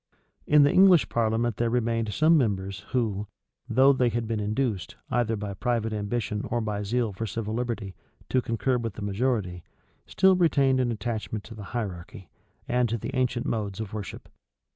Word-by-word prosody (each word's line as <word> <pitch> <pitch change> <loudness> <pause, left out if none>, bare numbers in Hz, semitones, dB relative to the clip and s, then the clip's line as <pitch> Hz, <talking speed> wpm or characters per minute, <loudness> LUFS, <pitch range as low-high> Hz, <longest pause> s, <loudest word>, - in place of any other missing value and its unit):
In 150 0 +6
the 145 - +4
English 185 -4 +6
parliament 115 0 0
there 120 0 +1
remained 115 -2 0
some 155 +10 +4
members 100 - 0
who, 105 -5 -1 0.4
though 130 +4 +5
they 125 -2 +2
had 115 -1 -2
been 110 -1 -1
induced, 105 -4 -2 0.2
either 120 -2 +1
by 100 -1 -5
private 115 0 -1
ambition 105 0 -2
or 120 - 0
by 105 -2 -2
zeal 115 +1 -1
for 110 +4 -4
civil 110 +1 -4
liberty, 115 -5 -3 0.4
to 130 - +2
concur 120 +2 0
with 115 -3 -4
the 105 - -6
majority, 100 -4 -1 0.4
still 190 0 +4
retained 140 -7 +3
an 125 -2 +1
attachment 110 -1 -4
to 115 - -11
the 105 -2 -9
hierarchy, 95 -2 -6 0.4
and 125 -1 +1
to 115 - -1
the - - -5
ancient 125 -2 0
modes 105 -3 -2
of 110 -3 -5
worship. 105 -2 -6
115 Hz, 175 wpm, -26 LUFS, 105-125 Hz, 0.4 s, In